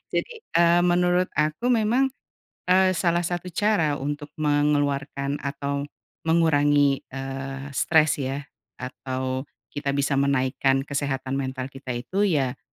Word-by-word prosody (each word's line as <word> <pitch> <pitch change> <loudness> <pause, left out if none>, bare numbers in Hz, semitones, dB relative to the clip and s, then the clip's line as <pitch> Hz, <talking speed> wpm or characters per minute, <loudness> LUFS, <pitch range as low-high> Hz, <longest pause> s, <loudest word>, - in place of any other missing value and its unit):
jadi, - - -1 0.3
eee, 170 0 +5
menurut 180 +1 +3
aku 155 +10 +1
memang, 240 +3 +3 0.6
eee, 185 0 +5
salah 175 -1 +1
satu 175 +1 -3
cara 175 -7 +2
untuk 145 +1 -4
mengeluarkan 145 -2 0
atau, 140 0 -3 0.4
mengurangi, 145 -4 +3
eee, 135 +1 -6
stres 155 +1 +3
ya, 135 +2 -3 0.3
atau, 130 +1 -4 0.3
kita 140 -1 -2
bisa 140 -1 +1
menaikkan 135 -1 +2
kesehatan 135 -1 -2
mental 130 0 -4
kita 135 -2 -6
itu, 190 +12 0
ya 135 -7 0
145 Hz, 120 wpm, -25 LUFS, 135-170 Hz, 0.6 s, eee